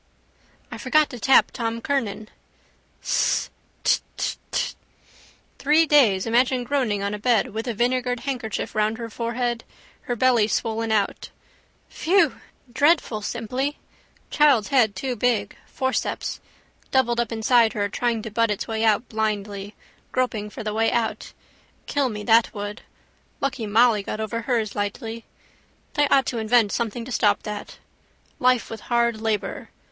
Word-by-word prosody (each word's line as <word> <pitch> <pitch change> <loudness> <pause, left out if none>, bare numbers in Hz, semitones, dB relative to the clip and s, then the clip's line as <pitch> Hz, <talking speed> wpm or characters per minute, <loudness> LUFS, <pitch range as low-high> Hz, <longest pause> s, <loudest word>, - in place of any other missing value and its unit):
I - - -7
forgot 310 -1 +2
to 245 - -7
tap 265 +4 +5
Tom 230 -1 -3
Kernan. 220 -6 -2 0.7
Sss. - - +1 0.3
Dth, - - +3 0.2
dth, - - -2
dth! - - -1 0.8
Three 305 +3 +4
days 235 -12 +4
imagine 245 +2 +2
groaning 240 -6 0
on 200 +1 -2
a 210 - -4
bed 225 -2 +1
with 225 +3 -4
a 235 - -2
vinegared 245 +1 0
handkerchief 245 -5 -3
round 215 +1 +1
her 230 -1 -6
forehead, 235 +1 -2 0.5
her 245 - +1
belly 240 -2 +3
swollen 225 0 -1
out. 205 -2 0 0.6
Phew! 385 +5 +1 0.3
Dreadful 285 -6 +2
simply! 250 +7 -3 0.5
Child's 280 -8 +4
head 240 -7 +3
too 260 -2 -3
big: 220 -3 0
forceps. 260 0 -2 0.5
Doubled 240 -3 +2
up 235 -1 -1
inside 225 0 +3
her 205 -1 0
trying 230 +1 -1
to 220 - -6
butt 230 +1 +2
its 210 - -2
way 220 0 -2
out 220 +2 +2
blindly, 205 -2 -3 0.4
groping 235 -5 -1
for 230 +2 -8
the 210 0 -3
way 225 +1 +2
out. 235 -2 -2 0.5
Kill 280 -3 0
me 210 -2 -6
that 225 +1 +4
would. 205 +1 -5 0.6
Lucky 265 -5 -2
Molly 220 0 +4
got 215 - -5
over 225 +1 -3
hers 230 -3 -1
lightly. 225 +3 -4 0.7
They 290 -1 +3
ought 270 -1 +4
to 235 - -2
invent 220 -1 +3
something 230 +1 -2
to 255 - -8
stop 205 -3 +2
that. 210 -1 -7 0.6
Life 250 -1 +2
with 225 - -7
hard 235 -2 +1
labour. 220 -2 -2
230 Hz, 150 wpm, -23 LUFS, 215-250 Hz, 0.8 s, tap